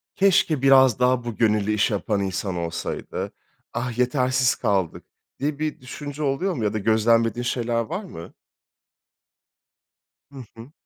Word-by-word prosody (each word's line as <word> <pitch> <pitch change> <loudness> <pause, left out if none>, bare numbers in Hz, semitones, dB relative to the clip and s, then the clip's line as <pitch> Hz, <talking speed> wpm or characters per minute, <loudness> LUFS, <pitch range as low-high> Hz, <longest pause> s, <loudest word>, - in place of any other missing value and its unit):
keşke 175 -7 +3
biraz 130 -3 +5
daha 125 -1 +2
bu 120 -3 -5
gönüllü 105 -2 +2
iş 105 +1 +1
yapan 100 0 -1
insan 95 0 -2
olsaydı. 85 -1 -4 0.4
Ah, 120 -1 -3
yetersiz 130 0 +2
kaldık.“ 100 -7 -1 0.4
diye 145 +1 -2
bir 155 -4 -3
düşünce 145 +3 -7
oluyor 165 +8 0
mu 115 - -4
ya 105 - 0
da - - -1
gözlemlediğin 115 +2 +2
şeyler 120 -1 -1
var 185 - -4
mı? 85 - -10 2.0
Hı 130 -3 -9
hı. 115 +5 -11
120 Hz, 140 wpm, -23 LUFS, 105-135 Hz, 2.0 s, biraz